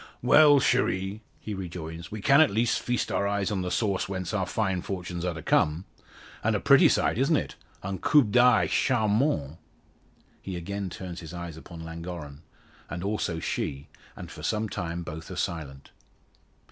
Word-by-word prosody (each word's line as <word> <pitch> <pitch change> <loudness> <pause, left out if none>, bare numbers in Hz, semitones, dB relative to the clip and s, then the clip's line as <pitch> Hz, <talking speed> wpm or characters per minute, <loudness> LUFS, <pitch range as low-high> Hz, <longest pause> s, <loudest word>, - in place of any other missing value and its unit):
"Well, 145 +3 +7
cherie;" 100 -5 0 0.2
he 110 - -6
rejoins, 85 -3 -6
"we 105 -1 -5
can 140 +3 +6
at 155 - +5
least 115 +3 +1
feast 125 -1 -2
our 100 - +1
eyes 100 0 -1
on 95 -3 -1
the 90 - -2
source 100 -2 0
whence 95 0 -4
our 95 -3 0
fine 95 -5 -1
fortunes 90 -2 -5
are 90 -2 -2
to 80 - -8
come. 80 +5 +2 0.6
And - - +2
a - - +1
pretty - - +6
sight - - +1
it - - +2
is, - - +4
isn't 160 -1 +3
it? - - -4 0.3
Un 95 0 -4
coup 150 - +5
d'oeil 120 +3 +4
charmant!" 110 - +1 0.8
He 95 - -6
again 100 +3 -4
turns 90 -1 -7
his 80 0 -9
eyes 85 -2 -6
upon 80 +1 -10
Llangorren, 80 -3 -7 0.5
as 85 +2 -5
also 100 -5 -2
she, 70 -3 -3 0.3
and - - -9
for - - -10
some 110 0 -1
time 85 -4 -4
both 80 -1 -8
are - - -6
silent. 70 -5 -4
95 Hz, 180 wpm, -27 LUFS, 85-110 Hz, 0.8 s, Well